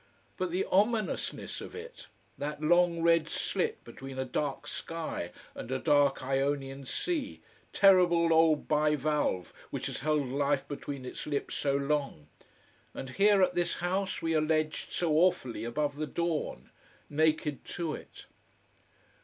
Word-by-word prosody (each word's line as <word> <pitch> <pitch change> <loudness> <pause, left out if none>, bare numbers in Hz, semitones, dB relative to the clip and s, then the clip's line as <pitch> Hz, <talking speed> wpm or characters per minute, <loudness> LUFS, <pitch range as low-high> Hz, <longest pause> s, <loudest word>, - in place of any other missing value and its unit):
But 185 -1 -2
the 180 +3 0
ominousness 210 +2 0
of - - -9
it: 475 +2 -9 0.3
that 150 +1 -4
long 170 +1 +3
red 165 -1 +4
slit - - -1
between 135 0 -9
a 130 - -1
dark 135 +2 -2
sky 165 - -4 0.2
and 125 - -7
a 130 - +1
dark 140 -1 +3
Ionian 135 0 -1
sea, 300 - -2 0.3
terrible 175 -4 +5
old 160 -2 +4
bivalve 150 -9 +1 0.2
which - - -4
has - - -3
held 150 -1 +1
life 140 0 0
between 140 -2 -6
its - - -6
lips 145 -2 -2
so 140 -1 0
long. 140 - -1 0.7
And 130 - -6
here, 200 +3 +5
at - - +2
this 175 0 0
house, 190 +2 -2
we 165 0 +1
are 155 - +3
ledged 155 0 0
so 170 -3 0
awfully 155 -9 +2
above 145 +4 -1
the 155 0 -2
dawn, 165 - -3 0.4
naked 155 -1 +1
to 165 -3 -3
it. - - -10
155 Hz, 145 wpm, -30 LUFS, 140-170 Hz, 0.7 s, terrible